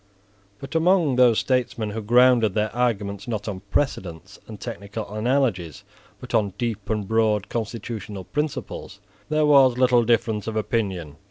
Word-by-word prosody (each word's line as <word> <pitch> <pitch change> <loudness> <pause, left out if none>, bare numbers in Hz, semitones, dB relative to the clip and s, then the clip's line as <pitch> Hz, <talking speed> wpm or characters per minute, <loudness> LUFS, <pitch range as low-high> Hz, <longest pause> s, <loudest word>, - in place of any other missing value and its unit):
But 135 +7 -9
among 165 -4 +3
those 125 -3 +5
statesmen 120 -4 -1
who 110 +2 -4
grounded 120 -1 +4
their 110 +1 -1
arguments, 105 -5 -1
not 110 -3 -4
on 100 -3 -4
precedents 95 - -3
and 110 -2 -9
technical 100 +2 -7
analogies, 110 - -1 0.4
but - - -10
on 100 -4 +1
deep 115 -5 -3
and 105 -3 -2
broad 110 -2 +1
constitutional 110 -3 -5
principles, 150 - -4 0.3
there 155 0 +2
was 135 -4 +5
little 125 -2 +4
difference 115 -2 0
of 110 - -3
opinion. 95 -8 -2
110 Hz, 145 wpm, -23 LUFS, 100-125 Hz, 0.4 s, those